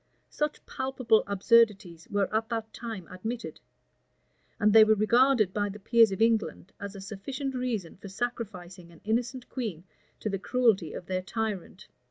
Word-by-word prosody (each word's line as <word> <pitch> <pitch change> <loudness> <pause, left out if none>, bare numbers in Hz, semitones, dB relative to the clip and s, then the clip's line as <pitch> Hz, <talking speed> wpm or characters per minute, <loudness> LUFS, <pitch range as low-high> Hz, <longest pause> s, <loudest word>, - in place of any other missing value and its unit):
Such 300 0 -3
palpable 260 -4 +1
absurdities 200 -5 +2
were 200 -2 +1
at 220 +1 0
that 225 -2 -4
time 225 -7 -7
admitted; 225 +6 -5 1.0
and 210 -1 +4
they 220 -1 +10
were 215 0 +4
regarded 230 -1 +3
by 205 -1 0
the 200 - -8
peers 225 +1 +4
of 195 +3 +1
England 220 -4 0
as 200 0 -7
a 195 - -8
sufficient 255 +8 -5
reason 240 -9 -3
for 200 - -10
sacrificing 190 -6 -5
an 165 - -18
innocent 235 +3 -1
queen 215 - -5 0.4
to - - -4
the 195 -2 -2
cruelty 210 - +2
of - - -7
their 185 0 -2
tyrant. 200 -2 -4
215 Hz, 160 wpm, -28 LUFS, 195-235 Hz, 1.0 s, they